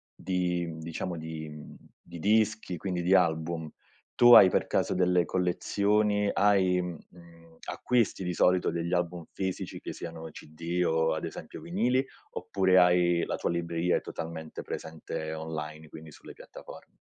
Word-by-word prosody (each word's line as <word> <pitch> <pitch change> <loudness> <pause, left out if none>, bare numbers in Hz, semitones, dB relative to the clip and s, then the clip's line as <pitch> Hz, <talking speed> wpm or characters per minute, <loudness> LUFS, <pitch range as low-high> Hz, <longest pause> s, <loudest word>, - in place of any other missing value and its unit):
di 90 -2 -1
mhmm, 80 -1 -7
diciamo 85 +2 -5
di 80 -1 -6
mhmm, 75 0 -11 0.3
di 85 - -11
dischi, 110 -1 +1
quindi 90 0 -3
di 90 +2 +3
album, 80 -3 +1 0.5
tu 120 0 +7
hai 95 - +10
per - - +1
caso - - 0
delle 90 -1 +3
collezioni, 105 +3 +1
hai 95 -3 +3
mhmm, 90 -2 -5
mhmm, 85 -1 -18
acquisti 120 -6 0
di 90 0 -2
solito 90 +1 +2
degli 85 +1 -3
album 90 -1 -1
fisici 95 -1 -4
che - - -7
siano 80 -1 -8
cd 85 +4 -4
o 80 0 +2
ad 80 - -3
esempio - - -8
vinili, 135 -7 +1 0.3
oppure 95 0 +2
hai 90 -1 +3
la - - -2
tua - - -2
è - - 0
libreria 85 +1 0
totalmente 80 -1 -7
presente 80 0 -6
online, 80 -1 -6
quindi 80 0 -11
sulle - - -13
piattafor - - -12
85 Hz, 155 wpm, -28 LUFS, 80-95 Hz, 0.5 s, hai